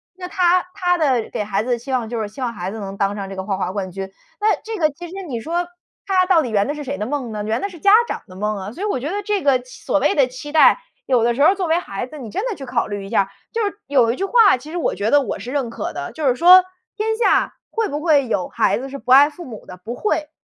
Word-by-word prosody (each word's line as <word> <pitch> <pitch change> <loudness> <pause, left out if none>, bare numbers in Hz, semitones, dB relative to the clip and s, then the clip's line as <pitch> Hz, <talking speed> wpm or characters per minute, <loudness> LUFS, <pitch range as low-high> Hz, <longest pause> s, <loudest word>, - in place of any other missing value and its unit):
那 365 -1 -7
她 360 -1 +3
她 355 -2 +1
的 265 -8 +1
给 210 - -2
孩 205 0 -1
子 250 - -3
的 240 - +2
期 255 +4 -8
望 245 -3 0
就 235 -2 -3
是 210 - -3
希 240 - -14
望 240 -2 -2
孩 185 -1 -5
子 220 - -7
能 195 -1 -6
当 200 +1 0
上 195 -1 -5
这 195 - -7
个 190 - -4
花 195 -1 -2
滑 185 -1 -2
冠 190 -2 -4
军。 195 +1 -6 0.3
那 425 +1 +3
这 445 -1 -5
个 310 -3 +3
其 345 +5 -9
实 - - -11
你 240 -4 -3
说 340 +6 -2 0.4
她 370 -2 +3
到 360 -3 +4
底 255 - -3
圆 205 -2 +2
的 290 - -1
是 295 -1 -6
谁 280 +2 -4
的 210 - -3
梦 255 -2 -3
呢？ 210 -1 -4
圆 220 +2 -1
的 - - -1
是 345 - -12
家 400 +5 +4 0.2
长 - - -5
的 185 - -13
梦 210 +1 -1
啊。 195 +2 -6
所 350 - -10
以 - - 0
我 405 - 0
觉 285 +5 -4
得 410 +2 -2
这 405 -4 -1
个 270 -3 +4
期 250 0 -14
所 - - +2
谓 - - +2
的 275 -3 +5
期 255 +4 -9
待， 315 - +6 0.3
有 250 -4 +2
的 235 - +1
时 275 - -1
候 300 - +7
儿 385 - +2
作 375 -3 -2
为 325 +1 +3
孩 240 - -5
子， 305 - -11
你 245 -6 -8
真 425 - -2
的 440 - -3
去 275 -5 -8
考 245 -2 -1
虑 205 -1 -5
一 195 - -9
下 - - +3
儿 195 - -13 0.2
就 455 -1 0
是 405 0 -4
有 255 -5 +3
一 240 - -3
句 - - -4
话， 440 -2 +5
其 300 +5 -11
实 350 - -4
我 335 - -1
觉 210 +2 -1
得 290 0 +6
我 - - -3
是 250 - -7
认 270 -5 -1
可 - - -5
的， - - -5
就 305 -3 -2
是 245 - +2
说： 360 +5 +8 0.3
“天 440 +1 0
下 470 - +2 0.2
会 450 -1 0
不 295 +1 -3
会 300 -5 +3
有 185 -5 -1
孩 - - +1
子 270 +2 -6
是 275 - -6
不 255 -2 -4
爱 280 +3 +8
父 345 +3 -11
母 225 -5 -10
的？ 180 - -10
不 225 +7 -7
会。” 310 -8 -1
270 Hz, 340 characters per minute, -20 LUFS, 220-350 Hz, 0.4 s, 说